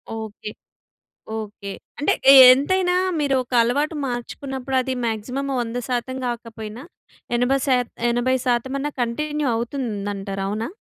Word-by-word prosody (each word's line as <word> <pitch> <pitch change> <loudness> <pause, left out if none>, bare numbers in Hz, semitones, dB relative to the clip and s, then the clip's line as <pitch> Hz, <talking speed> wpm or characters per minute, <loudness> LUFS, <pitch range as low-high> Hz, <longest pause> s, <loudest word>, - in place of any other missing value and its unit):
Okay. 220 -1 -7 0.9
Okay. 210 -2 -7 0.3
అంటే, 290 - +2 0.2
ఎ - - +9 0.2
ఎంతైనా 360 +7 +1 0.3
మీరు 285 -2 +1
ఒక 250 - -21
అలవాటు 285 +7 0
మార్చుకున్నప్పుడు, 265 +2 -5
అది 260 +1 -2
మాక్సిమం 250 +5 -3
100% 245 +2 -3
గాకపోయినా 230 -1 -6 0.5
ఎనభై 245 +3 +2
శాత్ 250 -3 +1 0.2
ఎనభై 245 +2 +1
శాతం 245 +1 0
అన్నా 295 +2 -2
కంటిన్యూ 295 +5 -2
అవుతుందంటారు 205 -5 -3
అవునా! 215 +3 -3
245 Hz, 115 wpm, -22 LUFS, 225-270 Hz, 0.9 s, ఎ